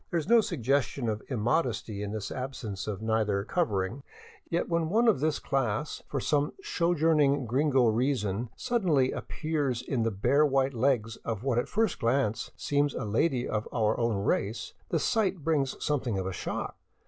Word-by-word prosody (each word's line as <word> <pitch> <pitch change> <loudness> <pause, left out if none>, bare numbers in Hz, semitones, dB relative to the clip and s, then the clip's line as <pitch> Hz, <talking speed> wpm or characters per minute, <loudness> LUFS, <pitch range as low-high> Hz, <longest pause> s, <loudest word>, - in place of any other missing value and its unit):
There 170 - +1
is 155 - -5
no 235 +1 +6
suggestion 135 - 0
of 110 -1 -1
immodesty 115 -4 -1
in 100 -1 -3
this 110 -2 -4
absence 125 -7 -5
of 105 0 -4
nether 110 -3 +1
covering, 110 - -1 0.5
yet 170 - 0
when 170 -1 0
one 230 +6 +3
of 220 - +4
this 155 +1 +1
class, 135 +1 -1
for 140 - -2
some 145 +3 +1
sojourning 160 - +2
gringo 130 +1 +3
reason, 115 -2 0
suddenly 180 - +1
appears 145 -6 -2
in 130 -4 -1
the 115 - +2
bare 115 +8 +2
white 135 -2 +2
legs 115 -3 +1
of 110 -1 -4
what 130 -3 +2
at - - -3
first 220 -2 +1
glance 115 -2 0
seems 145 -1 +1
a - - -3
lady 120 +5 +1
of 105 0 -2
our 110 -2 +1
own 115 -2 +1
race, 100 +2 -1 0.2
the 165 - +1
sight 190 -1 0
brings 145 -4 +1
something 130 -8 0
of 95 - -2
a 95 - -3
shock. - - -4
130 Hz, 170 wpm, -29 LUFS, 110-150 Hz, 0.5 s, no